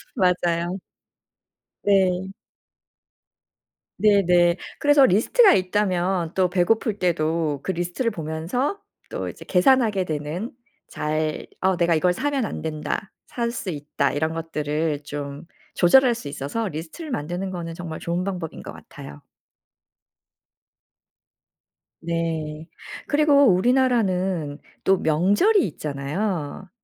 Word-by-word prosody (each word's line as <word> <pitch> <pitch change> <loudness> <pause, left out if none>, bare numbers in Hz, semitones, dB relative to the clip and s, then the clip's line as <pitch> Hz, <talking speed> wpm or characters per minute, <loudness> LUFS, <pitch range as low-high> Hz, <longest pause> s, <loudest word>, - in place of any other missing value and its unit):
맞아요. 180 -2 +1 1.0
네. 190 -1 +2 1.6
네네. 180 -4 +4 0.2
그래서 290 -1 +5
리스트가 260 - +5
있다면 185 -3 0
또 185 -2 +2
배고플 205 +4 +1
때도 160 -3 0
그 - - -1
리스트를 175 +7 -2
보면서 175 - -3 0.3
또 - - -4
이제 - - -11
계산하게 210 0 +3
되는 155 +7 -4 0.4
잘 155 0 -2
'어 190 -1 +2
내가 170 -1 +2
이걸 180 +3 +2
사면 275 +3 -1
안 - - -5
된다.', 160 +5 -4 0.2
'살 235 -1 -2
수 225 -4 -5
있다.' 145 -3 -1
이런 160 +2 -1
것들을 155 -2 -2
좀 145 +1 -6 0.3
조절할 245 +7 +5
수 190 - -8
있어서 145 +11 -3
리스트를 175 - -7
만드는 180 - -3
거는 170 -2 -5
정말 165 -2 -6
좋은 170 +1 -2
방법인 180 -4 -5
것 - - -8
같아요. 70 0 -12 2.8
네. 160 -2 -3 0.4
그리고 290 -1 +4
우리나라는 190 - +1 0.2
또 195 - +4
명절이 205 - +3
있잖아요. 155 +4 -4
180 Hz, 235 characters per minute, -23 LUFS, 160-205 Hz, 2.8 s, 그래서